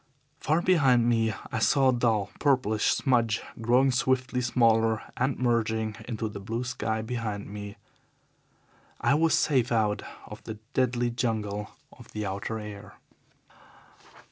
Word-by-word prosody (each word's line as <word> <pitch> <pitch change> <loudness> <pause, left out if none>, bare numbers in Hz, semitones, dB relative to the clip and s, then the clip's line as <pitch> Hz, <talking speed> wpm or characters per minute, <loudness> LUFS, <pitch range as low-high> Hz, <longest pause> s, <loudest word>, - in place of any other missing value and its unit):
Far 160 +3 +1
behind 130 -10 +4
me 115 -2 +2 0.2
I - - -1
saw 135 +4 +4
a - - +3
dull, 115 -5 +1
purplish 125 -7 +2
smudge 115 -5 +2 0.2
growing 125 +4 +3
swiftly 130 0 0
smaller 115 -2 +2
and 130 +1 0
merging 110 -3 0
into 115 -2 -3
the 105 -1 -7
blue 115 +5 -3
sky 110 -3 -2
behind 110 -4 -4
it. 100 0 -7 1.2
I - - +2
was 160 +2 +3
safe 130 -5 +2
out 110 -3 +1 0.2
of - - -11
the 110 - -6 0.2
deadly 120 -1 +1
jungle 110 -4 -2 0.2
of - - -16
the 105 -1 -3
outer 100 +3 -3
air. 105 -2 -9
115 Hz, 135 wpm, -27 LUFS, 110-125 Hz, 1.2 s, behind